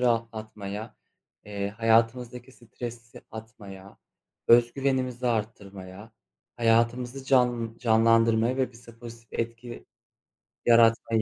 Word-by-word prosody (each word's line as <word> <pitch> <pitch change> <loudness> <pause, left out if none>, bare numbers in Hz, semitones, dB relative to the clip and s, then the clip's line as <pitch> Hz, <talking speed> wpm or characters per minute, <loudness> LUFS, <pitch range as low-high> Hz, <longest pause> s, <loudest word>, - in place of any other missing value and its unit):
rahatlatmaya, 110 -3 -3 0.5
eee, 100 -1 -4
hayatımızdaki 115 +3 0
stresi 120 -1 -10
atmaya, 105 -4 -11 0.5
öz 120 0 +6
güvenimizi 130 -2 -1
arttırmaya, 100 -2 -5 0.4
hayatımızı 120 +3 +1
can 120 -4 +1
canlandırmaya 115 +1 +3
ve 130 -2 -1
bize 115 0 -16
pozitif 115 -1 -12
etki 115 +1 -7 0.8
yaratmaya 115 -1 +4
115 Hz, 85 wpm, -26 LUFS, 110-120 Hz, 0.8 s, öz